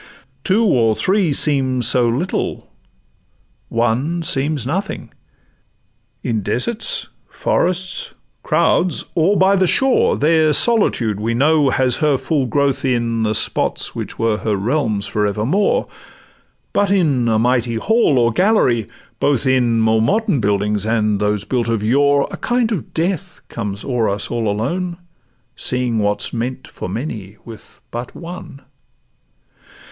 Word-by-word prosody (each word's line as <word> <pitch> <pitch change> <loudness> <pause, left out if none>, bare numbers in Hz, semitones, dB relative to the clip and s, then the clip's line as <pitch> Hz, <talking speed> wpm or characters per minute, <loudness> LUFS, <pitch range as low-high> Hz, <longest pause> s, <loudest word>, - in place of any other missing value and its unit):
Two 215 +5 +2
or 115 - +3
three 190 - +1
seem 135 -3 +2
so 120 +1 +3
little, 140 +11 -2 1.0
one 125 +9 0
seems 145 -3 0
nothing: 180 +9 -4 1.1
In 110 -3 -1
deserts, 210 - 0 0.2
forests, 185 +1 -1 0.3
crowds, 180 - +1
or 180 +5 +2
by 190 +1 +4
the 190 -1 +2
shore, 265 +7 +2
There 155 0 +3
solitude, 135 - +2
we 115 +2 -1
know, 145 +2 +3
has 130 -1 +1
her 150 -3 +2
full 135 +1 -1
growth 140 +2 0
in 120 -3 0
The 110 -1 0
spots - - -1
which - - -6
were 115 -2 +1
her 110 -1 -1
realms 110 -1 -1
for 105 -1 -1
evermore; 140 - 0 0.9
But 205 -1 +2
in 150 -11 +2
a 110 -1 +2
mighty 120 0 +1
hall 220 - +2
or 120 -1 +3
gallery, 125 - +2 0.3
both 140 -2 +1
in 125 -3 +2
More 110 0 +3
modern 200 - +1
buildings 105 -1 0
and 110 -2 0
those 105 -1 0
built 120 -3 -1
of 115 -2 -1
yore, 140 +5 +3
A - - -6
kind 240 -2 0
of 200 - -4
death 175 +2 -2
comes 105 -3 -5
o'er 120 -5 0
us 100 +1 -3
all 115 -2 -1
alone, 170 - -2 0.6
Seeing 125 -3 -1
what 105 0 0
's - - -3
meant 125 +2 -4
for - - -7
many 105 -2 -6
with 115 -2 -13
but 120 +1 -6
one. 170 -5 -9
130 Hz, 140 wpm, -18 LUFS, 110-165 Hz, 1.1 s, by